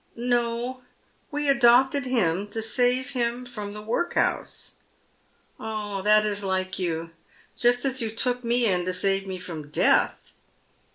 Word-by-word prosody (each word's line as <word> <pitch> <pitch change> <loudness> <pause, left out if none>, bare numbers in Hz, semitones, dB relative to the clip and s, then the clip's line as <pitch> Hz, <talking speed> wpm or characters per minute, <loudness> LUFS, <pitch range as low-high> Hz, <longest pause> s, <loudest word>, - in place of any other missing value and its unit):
" - - -37 0.2
No. 240 +2 -1 0.5
We 295 0 -2
adopted 265 0 +4
him 200 -6 +1
to 220 +2 -4
save 250 +3 +1
him 245 -1 -1
from 210 -4 -7
the 210 0 -8
workhouse." 240 +11 -1 0.4
" - - -38
Ah, 210 -3 -4
that 215 +1 +4
is 205 -1 -2
like 190 0 -2
you 165 -2 -2 0.2
— - - -27
just 245 +1 +2
as 265 -1 0
you 225 - -1
took 245 +3 -1
me 240 +1 +2
in 180 -4 +1
to 185 - -1
save 195 +1 0
me 190 -1 -4
from 165 -5 -8
death." - - +1
225 Hz, 160 wpm, -25 LUFS, 195-245 Hz, 0.5 s, adopted